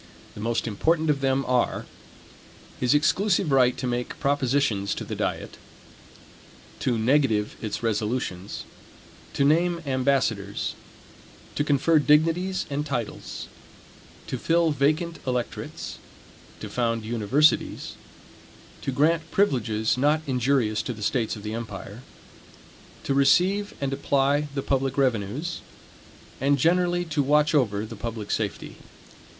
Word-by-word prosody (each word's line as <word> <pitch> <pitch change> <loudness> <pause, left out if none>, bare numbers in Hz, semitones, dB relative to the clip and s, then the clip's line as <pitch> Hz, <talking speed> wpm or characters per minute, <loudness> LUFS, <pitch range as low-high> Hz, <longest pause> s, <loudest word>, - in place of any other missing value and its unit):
The 105 - -9
most 115 +1 -1
important 155 +9 +1
of 140 -2 -2
them 135 0 +1
are: 125 -1 0 0.9
his 125 +3 +3
exclusive 175 +3 +2
right 130 -2 +4
to - - -3
make 120 0 -3
propositions 135 -7 +1
to - - -5
the - - -6
diet; - - -3 1.2
to 120 -3 0
negative 110 -3 +2
its 110 +1 -4
resolutions; 105 -3 -2 0.7
to 140 - +2
name 170 +4 +3
ambassadors; 130 -7 0 0.8
to 145 - 0
confer 150 +2 +3
dignities 165 +6 +2
and 145 0 -2
titles; 125 -7 -5 0.8
to - - -4
fill 165 -1 +2
vacant 155 +4 0
electorates; 125 -2 -4 0.6
to - - -5
found 115 -2 -1
universities; 120 +7 +1 0.9
to - - -2
grant 160 +5 +1
privileges 115 - +1
not 150 +3 +2
injurious 125 -4 +1
to 125 - -4
the 105 -2 -8
states 115 0 0
of 105 - -10
the 105 0 -4
empire; 110 -1 -7 1.0
to 140 - 0
receive 180 +9 +3
and 135 -1 -2
apply 140 +1 +1
the 135 - -2
public 135 0 0
revenues; 130 - -1 0.8
and 140 +1 +3
generally 175 +4 +2
to 155 -3 0
watch 150 +3 +3
over 110 -8 +1
the 115 +1 -8
public 110 -1 -5
safety. 100 -6 -3
135 Hz, 120 wpm, -25 LUFS, 115-150 Hz, 1.2 s, right